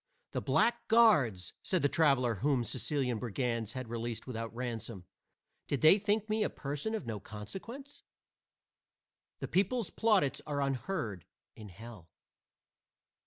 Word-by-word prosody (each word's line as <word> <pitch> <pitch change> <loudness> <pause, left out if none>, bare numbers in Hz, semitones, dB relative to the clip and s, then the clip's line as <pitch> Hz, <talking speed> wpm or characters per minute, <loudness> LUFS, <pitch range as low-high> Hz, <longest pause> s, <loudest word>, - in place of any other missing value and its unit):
"The - - -2
blackguards!" 215 - +3
said 185 -8 0
a - - +7
traveler 135 -6 +3
whom 135 -3 +2
Sicilian 130 -1 -1
brigands 115 -1 -2
had 130 -2 -5
released 115 0 -4
without 115 -3 -5
ransom; 115 -5 -5 0.6
"did 140 - -1
they 160 +6 +7
think 210 +1 0
me 215 0 0
a - - +2
person 145 +11 -3
of 215 - -4
no 110 -3 -4
consequence?" 195 - -9 1.4
The - - -3
people's 200 +2 +1
plaudits 210 -11 +2
are 145 -1 -2
unheard 130 - -3 0.3
in 105 -2 -10
hell. 100 -2 -11
130 Hz, 125 wpm, -32 LUFS, -, 1.4 s, a